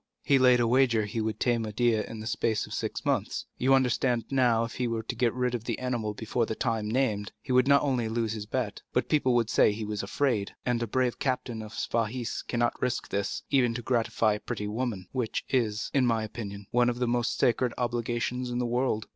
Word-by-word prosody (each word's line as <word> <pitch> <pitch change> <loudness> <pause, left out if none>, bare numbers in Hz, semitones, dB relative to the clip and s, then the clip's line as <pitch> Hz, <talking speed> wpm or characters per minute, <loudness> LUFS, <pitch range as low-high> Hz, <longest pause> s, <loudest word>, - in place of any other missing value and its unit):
"He 140 -2 +4
laid 125 -1 +6
a 120 - +3
wager 115 -3 +3
he 110 +2 -3
would 110 0 -2
tame 120 -2 +1
Médéah 110 0 +1
in 110 -1 -7
the - - -7
space 110 -1 0
of - - -9
six - - -3
months. - - -1
You 135 +2 +5
understand 125 -2 +1
now 125 -4 +3
that - - +1
if - - -10
he 125 - +1
were 115 -1 -2
to - - -4
get 120 -2 +2
rid 125 0 -1
of 115 -2 -3
the - - -2
animal 120 -5 -2
before 115 +1 -1
the 110 - -3
time 110 -3 -1
named, 110 -4 0
he 130 - -6
would 125 +1 +4
not 140 0 +5
only 125 -5 0
lose 115 -1 -1
his 105 -1 -6
bet, 115 -3 -2
but 125 - 0
people 130 -5 +3
would 115 -2 +2
say - - +5
he 105 +1 -4
was 105 -1 -3
afraid; 105 -1 -1
and 120 -1 +1
a 115 - -1
brave 125 +2 0
captain 125 -3 -2
of 110 0 -9
Spahis 115 +1 -2
cannot 120 -1 -1
risk 125 -1 -1
this, 100 0 -2
even 125 -4 +3
to 120 - -4
gratify 115 -3 +1
a 105 - -3
pretty 105 - -4
woman, 110 -4 -3
which 125 -4 -2
is, 110 -5 0
in 130 -3 +3
my 115 -2 +1
opinion, 105 -2 -6
one 120 0 +3
of 120 - -2
the 125 0 0
most 120 -1 0
sacred 120 +1 +2
obligations 120 +1 -1
in 120 - -2
the 125 - 0
world." 120 -2 0
120 Hz, 230 wpm, -28 LUFS, 110-125 Hz, -, laid